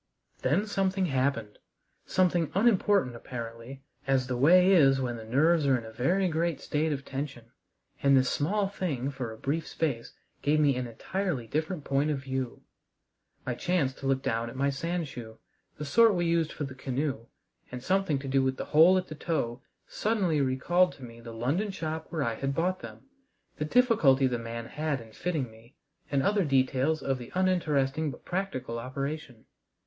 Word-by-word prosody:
Then 160 +11 +2
something 195 -2 0
happened, 130 -7 -1 0.5
something 175 -3 +2
unimportant 200 - +3
apparently, 115 +2 -8 0.2
as 135 -2 +2
the 125 0 -2
way 180 +9 +6
is 135 -7 +5
when 125 -2 -2
the 115 - -8
nerves 145 +7 +3
are 130 -2 +4
in 115 - -7
a 110 - -9
very 175 +12 +1
great 165 -2 0
state 155 +1 -1
of 140 -2 -3
tension, 135 -4 -6 0.5
and 140 -1 +5
this 130 0 +3
small 195 +10 0
thing 145 -9 -3
for 130 -4 -5
a 110 - -9
brief 145 +7 -2
space 140 -8 -2 0.3
gave 150 +1 +2
me 145 -3 +4
an 125 -1 -3
entirely 150 - -3
different 155 - -2
point 140 +2 +1
of 150 - 0
view. 130 -2 -4 0.8
I - - -1
chanced 155 -8 -1
to 135 - -4
look 135 0 +1
down 115 +1 -1
at 115 - -10
my 140 +1 +1
sand 165 +3 -2
shoe 115 -4 -9 0.4
the 150 - -5
sort 225 +8 +5
we 175 -1 0
used 165 -1 +1
for - - -5
the 135 -2 -5
canoe 130 -1 -3 0.4
and 125 0 -6
something 190 -3 +1
to 135 0 -6
do 135 0 +2
with 130 0 0
the - - -4
hole 165 +5 +7
at 185 - -1
the - - -7
toe 140 -6 -2 0.2
suddenly 190 -9 0
recalled 175 +8 +2
to 135 - -14
me 115 -1 -10
the 115 0 -9
London 140 - -1
shop 160 -4 -4
where 160 -4 -1
I 115 - 0
had 135 +4 -3
bought 180 +3 0
them, - - -10 0.5
the 150 - -2
difficulty 155 - +4
the 125 -2 0
man 115 0 -6
had 150 +1 -2
in 115 -1 -13
fitting 150 -5 -2
me, 115 +3 -19 0.3
and 140 -1 +1
other 205 -1 +2
details 135 +1 +1
of 135 -1 -1
the 120 - -9
uninteresting 160 -6 +1
but 130 - -10
practical 175 -11 -3
operation. 135 0 -5
140 Hz, 185 wpm, -29 LUFS, 130-170 Hz, 0.8 s, hole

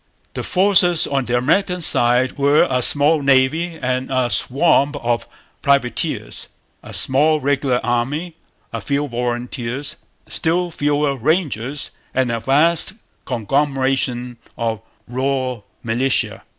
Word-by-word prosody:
The - - -4
forces 180 -3 +3
on 135 -2 -1
the 120 0 0
American 180 +8 +1
side 125 -4 +3
were 140 +2 +4
a 130 -1 0
small 145 +4 +3
navy 140 +5 +2
and 130 0 -2
a 130 -2 0
swarm 140 - +2
of 120 -4 -2 0.3
privateers, 140 -4 0 0.3
a - - -12
small 150 +4 +3
regular 140 -3 0
army, 135 +8 -2 0.4
a - - -4
few 145 +1 -1
'volunteers,' 120 +2 -4 0.3
still 175 +2 0
fewer 145 -2 0
'rangers,' 140 - -1 0.2
and 130 -2 +1
a 115 - -2
vast 150 +9 +3 0.3
conglomeration 130 0 -1 0.2
of 115 -2 -2 0.3
raw 130 -1 -2 0.2
militia. 120 +3 0
135 Hz, 115 wpm, -19 LUFS, 125-150 Hz, 0.4 s, were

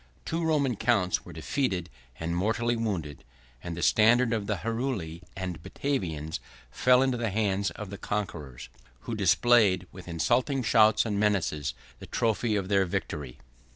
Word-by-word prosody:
Two 165 +1 -2
Roman 140 -7 +1
counts 90 -2 +1
were 90 - -10
defeated 90 - -2 0.3
and 85 +1 -2
mortally 115 +6 +1
wounded; 90 - -3 0.4
and 85 -1 -5
the 85 - -3
standard 115 +2 +4
of 105 -3 -2
the 105 - 0
Heruli 110 -6 -3 0.2
and 90 -4 -4
Batavians 80 - -3 0.3
fell 125 +1 +4
into 130 -2 +1
the 115 -1 0
hands 100 -1 0
of 105 -2 -8
the 100 - -7
conquerors, 75 -11 -4 0.3
who 115 - -5
displayed, 105 -2 +4
with 95 -1 -11
insulting 125 - +1
shouts 110 -1 +5
and 105 -3 -1
menaces, 95 -8 0 0.2
the - - -10
trophy 115 -1 0
of 100 -2 -1
their 100 -1 +3
victory. 70 -6 -4
105 Hz, 155 wpm, -28 LUFS, 90-120 Hz, 0.4 s, shouts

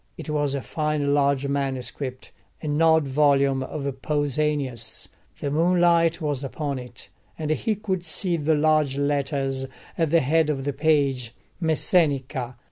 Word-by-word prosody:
It 155 - -6
was 145 -2 0
a 140 - -3
fine 150 -2 -1
large 140 -1 +2
manuscript, 135 -1 -3 0.3
an 150 0 -1
odd 160 -2 +4
volume 140 -1 +3
of 140 +2 -5 0.2
Pausanias. 145 -4 -1 0.3
The 140 - -2
moonlight 170 +1 +3
was 145 -4 -2
upon 140 0 -3
it, 125 -1 -10 0.3
and 155 -1 -2
he 215 +7 0
could 190 -3 -3
see 175 +1 -1
the 155 0 +1
large 150 -2 +2
letters 140 -2 -1 0.3
at 165 -2 +2
the 165 +1 +4
head 155 +3 +2
of 135 -3 -2
the 145 - -1
page: 135 -5 +1 0.3
ΜΕΣΣΕΝΙΚΑ. 145 -6 +1
145 Hz, 140 wpm, -24 LUFS, 135-155 Hz, 0.3 s, odd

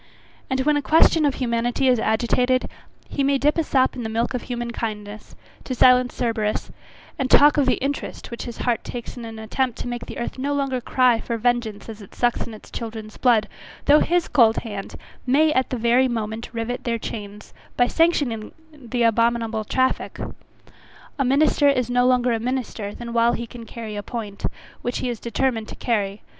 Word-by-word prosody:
And 265 0 0
when 295 +2 +2
a - - 0
question 315 +1 +4
of 280 - 0
humanity 240 +1 0
is 250 -3 +4
agitated, 250 +3 +1 0.4
he 280 - -1
may 275 0 +3
dip 295 +2 +2
a - - +2
sop 265 -3 +2
in 250 - -5
the 220 - -3
milk 230 +3 -1
of 250 - -2
human 240 -1 -4
kindness, 215 -2 -6 0.3
to 255 - -4
silence 250 0 +5
Cerberus, 220 -3 -1 0.5
and 265 -1 0
talk 295 +1 +7
of 285 -3 +2
the 255 - +4
interest 275 -2 -4
which 235 - -6
his 240 - -7
heart 240 -2 +1
takes 240 -2 -7
in 240 -2 -7
an 225 -1 -8
attempt 235 +3 -2
to - - -5
make 240 0 -5
the - - -7
earth 235 - -4
no 285 +2 -1
longer 270 -3 -1
cry 250 -1 +3
for 235 - -3
vengeance 235 -2 -1
as 220 -1 -8
it 200 - -14
sucks 240 -1 0
in 225 - -8
its 215 - -15
children's 220 -2 -7
blood, 230 -4 +3 0.4
though 295 +1 +7
his 350 +1 +1
cold 230 -5 +4
hand 205 -4 -6 0.3
may 305 +4 +4
at 260 -2 +1
the 255 - -2
very 240 +3 +3
moment 225 -1 -4
rivet 235 +1 -4
their 235 -1 -1
chains, 210 -2 -8 0.2
by 245 - +5
sanctioning 275 -7 +1 0.2
the 245 -4 -3
abominable 230 -1 +1
traffick. 260 +4 -1 1.0
A - - +3
minister 285 +2 +4
is 250 -3 +1
no 245 0 +3
longer 250 -1 +3
a 225 - 0
minister 235 -4 -3
than 235 -1 -7
while 235 0 +3
he 235 - -3
can 230 0 -11
carry 220 -1 -7
a 205 - -3
point, 210 -2 -6 0.4
which 245 - -2
he 250 - -2
is 235 -3 -4
determined 235 -1 -1
to - - -8
carry. 205 -4 -1
240 Hz, 200 wpm, -23 LUFS, 225-260 Hz, 1.0 s, talk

